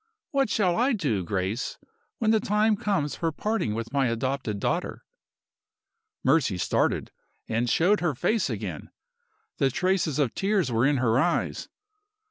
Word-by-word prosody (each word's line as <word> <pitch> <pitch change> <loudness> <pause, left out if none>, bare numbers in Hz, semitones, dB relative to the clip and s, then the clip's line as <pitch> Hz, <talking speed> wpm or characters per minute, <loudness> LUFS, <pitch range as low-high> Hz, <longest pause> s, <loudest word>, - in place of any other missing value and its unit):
What 275 -5 +1
shall 185 -5 +1
I 250 +4 +3
do, 135 - 0
Grace, 95 +5 -2 0.4
when 220 -4 +2
the 220 - +4
day 210 +1 +2
comes 195 -10 0
for 165 -1 -1
parting 210 - -1
with 115 +2 -5
my 135 -2 +2
adopted 115 -2 -2
daughter?" - - -2 1.2
Mercy 135 - +2
started, - - 0 0.4
and 115 +2 0
showed 190 - +3
her 165 -5 0
face 215 - +1
again. - - -5 0.7
The 135 -3 +3
traces 175 -1 0
of 140 -6 +1
tears 195 -8 0
were 115 +3 +3
in 145 -1 +2
her 120 -1 +2
eyes. 175 +4 0
150 Hz, 145 wpm, -26 LUFS, -, 1.2 s, the